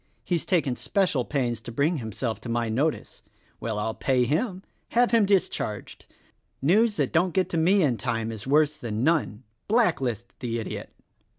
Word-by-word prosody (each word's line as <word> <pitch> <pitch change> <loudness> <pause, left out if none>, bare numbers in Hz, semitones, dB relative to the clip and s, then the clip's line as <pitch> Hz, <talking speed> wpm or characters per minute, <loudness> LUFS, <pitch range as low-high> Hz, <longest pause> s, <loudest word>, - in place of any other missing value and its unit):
He's 175 -3 -1
taken 150 -9 +1
spe - - -11
cial 130 -9 -2
pains 120 -5 -1
to 120 - -8
bring 150 +8 +1
himself 115 -1 -4
to 120 - -7
my 115 -1 0
notice. 140 +8 -1 0.4
Well, 110 -2 -3
I'll 110 +1 -1
pay 130 0 +1
him: 185 - -1 0.3
Have 240 +1 +4
him 225 -4 +4
discharged! 185 - -1 0.5
News 210 - +3
that - - 0
don't 175 +1 +2
get 190 -1 +2
to 170 - -2
me 185 +4 +4
in 130 -6 +2
tune 115 -2 -2
is 110 +1 -7
worse 150 +1 +3
than 115 -5 -3
none. 140 -8 +1 0.2
Blacklist 135 - 0
the 115 -2 -2
idiot." 110 - -6
140 Hz, 175 wpm, -26 LUFS, 115-180 Hz, 0.5 s, Have